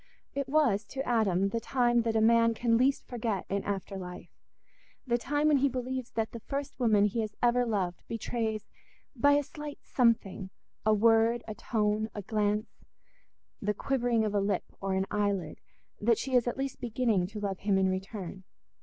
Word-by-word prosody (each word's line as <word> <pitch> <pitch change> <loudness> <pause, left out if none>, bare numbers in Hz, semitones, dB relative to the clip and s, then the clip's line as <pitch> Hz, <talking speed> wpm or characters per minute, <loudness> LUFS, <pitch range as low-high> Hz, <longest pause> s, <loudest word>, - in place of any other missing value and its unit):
It 280 -1 -3
was 270 -9 +3
to 270 +6 -5
Adam 195 -5 +2
the 230 - -1
time 240 -1 +2
that 225 -1 -1
a 220 - +3
man 230 0 +4
can 230 0 +2
least 260 +4 +2
forget 225 -6 -2
in 200 0 -1
after 195 -1 -3
life, 180 -1 -8 0.7
the 240 -2 +1
time 290 +4 +1
when 295 - +5
he 280 +1 +3
believes 255 0 -3
that 225 -1 -1
the 230 - -7
first 280 +3 -5
woman 215 -4 +4
he 210 +3 0
has 215 -1 -4
ever 245 0 +3
loved 185 -5 -1
betrays 225 -1 -3 0.5
by 285 +4 +4
a 290 0 +3
slight 295 0 -8
something—a 215 -3 0
word, 225 +2 +4
a 215 - -4
tone, 215 0 0
a 205 - -5
glance, 210 +1 -1 0.8
the 210 0 0
quivering 240 -2 +1
of 210 - -2
a 205 - +2
lip 200 +1 0 0.2
or 195 -1 -1
an 190 0 +1
eyelid—that 205 +2 -2
she 265 - -4
is 245 -1 +4
at 240 - -2
least 270 -1 -4
beginning 230 -6 +1
to 210 +2 -7
love 195 -2 -3
him 200 -1 +1
in 190 0 +3
return. 190 0 -4
225 Hz, 180 wpm, -30 LUFS, 205-245 Hz, 0.8 s, when